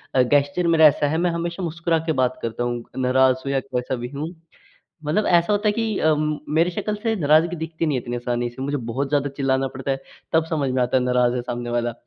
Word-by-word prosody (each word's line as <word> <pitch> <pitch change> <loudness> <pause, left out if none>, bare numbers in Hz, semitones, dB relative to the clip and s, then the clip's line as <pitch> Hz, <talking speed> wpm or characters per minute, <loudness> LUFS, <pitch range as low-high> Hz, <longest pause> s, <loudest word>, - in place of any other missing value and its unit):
अ, 130 - +6
gesture 145 +6 +2
मेरा 160 -2 +7
ऐसा 145 0 +2
है, 160 +2 0
मैं 175 0 +1
हमेशा 170 +2 -3
मुस्कुरा 170 0 0
के - - +4
बात 125 0 -1
करता 115 +1 -3
हूँ। 120 -1 -2
नाराज़ 130 0 +3
हूँ 135 - -1
या 135 - +2
कैसा 125 0 -3
भी 120 0 -5
हूँ। 155 +5 -4 0.7
मतलब 170 +8 +1
ऐसा 175 +3 +3
होता 205 +1 +1
है - - +3
कि 220 -2 -1
अम, 155 -1 +1 0.2
मेरी 170 +3 +3
शकल 210 +4 -3
से 225 -1 +1
नाराज़गी 155 +4 +3
दिखती 160 +1 -3
नहीं 150 -3 +1
है - - -5
इतनी 120 0 -4
आसानी 120 0 -2
से 130 +2 -8
मुझे 145 +1 -1
बहुत 135 +4 -2
ज़्यादा 145 0 +1
चिल्लाना 135 -1 +1
पड़ता 130 +1 -5
है, 135 - +1 0.4
तब 160 0 +3
समझ 145 -5 0
में 130 0 +1
आता 125 +1 +1
है 130 - +3
नाराज़ 125 -1 +2
है 125 - -1
सामने 120 0 -4
वाला। 120 0 0
145 Hz, 245 wpm, -22 LUFS, 125-165 Hz, 0.7 s, मेरा